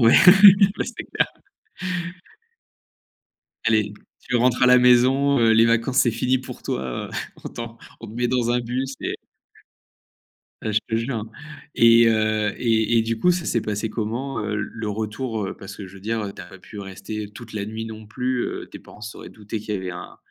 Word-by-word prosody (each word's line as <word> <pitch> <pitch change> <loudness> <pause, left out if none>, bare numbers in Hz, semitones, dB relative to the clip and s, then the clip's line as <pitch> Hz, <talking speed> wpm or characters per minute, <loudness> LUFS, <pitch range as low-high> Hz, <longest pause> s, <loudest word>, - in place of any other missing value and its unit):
ouais. 115 -1 +6 0.7
C'est - - -7
clair! - - 0 2.4
Aller! 110 -2 +2 0.3
Tu 125 - -1
rentres 125 +1 +2
à - - +7
la 125 0 +7
maison, 130 +3 +4
heu, 115 -1 +4
les 115 +1 +6
vacances, 115 +3 +2
c'est 120 - +5
fini 125 +3 +1
pour 130 - -10
toi 65 - -2 0.3
heu. - - -13 0.3
On - - -4
t'en 115 -1 -8 0.2
on 115 - -8
te 105 - -10
met 120 +1 -1
dans 120 -2 +1
un 120 0 +2
bus 130 +3 -3
et - - -2 1.5
Bah, 110 - -2
je 105 - +3
te 110 - 0
jure, 115 +4 -2
hein! 110 0 -5 0.5
Et 115 0 +7
heu 110 -1 +1
et 115 -1 +2
et - - +3
du 115 0 -2
coup, 180 +11 +3
ça 175 -1 0
s'est 115 - 0
passé 105 +1 -3
comment, 120 +3 -3
heu, 105 -1 -2
le 110 +1 -4
retour? 110 +1 -3
Heu, - - -5
parce 100 -1 -10
que 100 - -8
je 95 - -14
veux 100 - -12
dire, 110 +3 -2
heu, 100 - -5
tu - - -9
as 90 - -11
pas 95 -1 -13
pu 100 +3 -10
rester 100 +2 -7
toute 110 +2 -11
la 105 -2 -3
nuit 110 +2 -5
non 110 -1 -9
plus. 125 +3 -2
Heu, - - -5
tes - - -11
parents - - -16
se 105 0 -7
seraient - - -10
doutés 105 0 -7
qu'il 105 0 -4
y - - -1
avait 95 -1 -5
un 90 - -9
115 Hz, 210 wpm, -23 LUFS, 105-120 Hz, 2.4 s, à